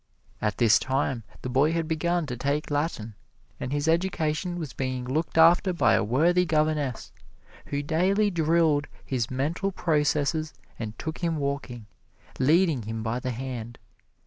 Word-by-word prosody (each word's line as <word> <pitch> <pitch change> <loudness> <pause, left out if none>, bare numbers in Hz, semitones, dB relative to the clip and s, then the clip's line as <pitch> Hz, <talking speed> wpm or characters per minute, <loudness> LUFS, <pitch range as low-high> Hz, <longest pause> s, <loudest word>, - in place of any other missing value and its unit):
At 105 -2 -1
this 110 -2 +5
time 130 -2 -1 0.2
the - - -3
boy 140 +5 +3
had 165 -1 -1
begun 170 +1 0
to 125 -4 -4
take 140 +5 -2
Latin, 145 -7 -2 0.5
and 125 - -4
his 145 +1 -1
education 170 0 0
was 155 -7 -5
being 130 -1 -3
looked 155 +6 -2
after 175 +3 +6
by 175 - +3
a - - +3
worthy 165 - +3
governess, 155 -5 0 0.6
who 145 0 -2
daily 190 +7 +2
drilled 160 -3 +2 0.2
his 125 -4 -1
mental 155 +9 -1
processes 155 -2 0 0.2
and 110 -2 -5
took 160 0 -5
him 170 -2 -1
walking, 140 -5 -4 0.5
leading 155 +1 +3
him 110 +1 -5
by 115 +2 -1
the 130 - -4
hand. 120 -2 -5
150 Hz, 150 wpm, -26 LUFS, 130-165 Hz, 0.6 s, after